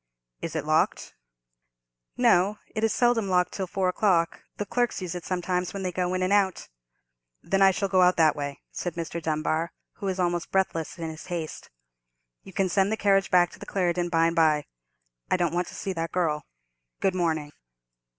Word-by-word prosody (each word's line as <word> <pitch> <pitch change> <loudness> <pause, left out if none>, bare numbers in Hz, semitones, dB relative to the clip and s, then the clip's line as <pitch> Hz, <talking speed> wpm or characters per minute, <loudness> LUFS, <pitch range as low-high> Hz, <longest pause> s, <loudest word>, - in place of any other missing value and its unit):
"Is 165 - -5
it 155 -2 -2
locked?" 155 +1 +1 1.0
"No; 195 +4 +4 0.2
it 215 - -2
is 225 - +3
seldom 240 -4 +2
locked 180 -1 +2
till 190 -2 -3
four 190 0 0
o'clock; 180 -3 +2 0.2
the 205 - -2
clerks 240 +4 0
use 180 -2 -4
it 180 -1 -6
sometimes, 180 0 -2
when 195 - -4
they 185 - -1
go 180 +1 -1
in 185 - 0
and 185 +2 +2
out." 195 -2 +1 0.7
"Then 195 0 +1
I 195 - +8
shall 195 +1 0
go 190 -1 +3
out 180 0 +5
that 160 -2 +5
way," 145 -1 -5
said 175 -2 -4
Mr. 170 0 -4
Dunbar, 160 +1 -1 0.2
who 200 - -4
was 190 0 -2
almost 175 -1 0
breathless 185 -4 0
in 165 -1 -4
his 155 - -10
haste. 170 -3 -5 0.7
"You 195 - -13
can 195 0 +1
send 195 +2 +2
the 220 - 0
carriage 195 -2 +3
back 175 -1 +4
to - - -14
the - - -10
Clarendon 175 -2 0
by 165 -1 +3
and 165 0 +1
by. 155 -3 +3 0.6
I - - +3
don't 175 -3 0
want 175 0 0
to - - -10
see 195 - -3
that 165 -1 -3
girl. 155 -5 -1 0.5
Good 195 - +1
morning." 160 -5 -1
180 Hz, 200 wpm, -26 LUFS, 165-195 Hz, 1.0 s, I